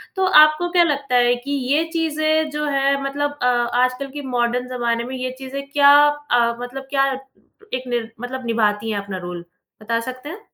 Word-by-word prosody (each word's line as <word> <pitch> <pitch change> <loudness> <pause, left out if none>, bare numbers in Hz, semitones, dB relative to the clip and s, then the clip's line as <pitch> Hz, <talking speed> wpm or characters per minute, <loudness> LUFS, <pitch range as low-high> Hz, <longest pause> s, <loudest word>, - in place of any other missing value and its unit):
तो 380 - +1 0.2
आपको 305 +3 +1
क्या 350 -1 +5
लगता 280 -5 -1
है 245 0 +4
कि 245 +4 -7 0.2
ये 310 +2 +3
चीज़ें 315 -1 0
जो 300 0 -3
हैं, 275 -1 +1
मतलब 290 +1 -2
अ, 250 - +1
आजकल 250 +2 0
के 290 +1 -6
मॉडर्न 245 0 -1
ज़माने 235 -2 -1
में 260 +2 -6
ये 255 0 -3
चीज़ें 270 +1 -6
क्या 285 -1 +6 0.4
अ, 235 -1 +3
मतलब 265 +2 -7
क्या 275 -1 +2 0.6
एक 255 0 -2
निर 235 -2 -3
मतलब 255 0 -6
निभाती 220 -1 0
हैं 205 - -1
अपना 200 -2 -6
रोल? 175 -1 -7 0.4
बता 230 +2 -1
सकते 255 +4 -7
हैं? 370 +7 -8
255 Hz, 190 wpm, -20 LUFS, 240-290 Hz, 0.6 s, क्या